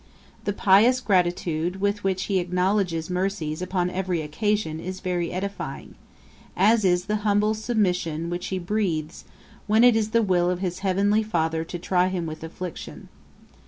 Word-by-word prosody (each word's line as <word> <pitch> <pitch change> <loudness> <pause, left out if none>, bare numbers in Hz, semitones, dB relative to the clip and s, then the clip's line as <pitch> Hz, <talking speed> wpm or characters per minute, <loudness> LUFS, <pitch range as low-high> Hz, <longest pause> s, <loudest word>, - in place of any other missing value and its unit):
The 205 - +1
pious 210 +6 +5
gratitude 180 -4 0
with 205 +1 -1
which 190 -1 0
he 195 -2 0
acknowledges 180 -2 0
mercies 180 -4 -2
upon 180 -1 -1
every 180 -3 -2
occasion 160 0 -1
is 185 +2 -6
very 175 -2 -2
edifying; 185 -7 -5 0.6
as 215 +4 +4
is 180 -1 +2
the 210 +1 0
humble 210 0 +2
submission 180 -7 -1
which 175 +1 -3
he 190 - -2
breathes, 175 -5 -2 0.4
when 220 +2 +4
it 245 -2 +7
is 220 -1 +1
the 230 +1 +2
will 180 -3 +2
of 180 - 0
his 180 -1 -3
heavenly 200 +2 +2
Father 165 -6 -1
to 175 - -6
try 180 +1 +1
him 185 -2 -2
with 155 0 -7
afflictions. 170 +1 -8
185 Hz, 160 wpm, -24 LUFS, 175-205 Hz, 0.6 s, it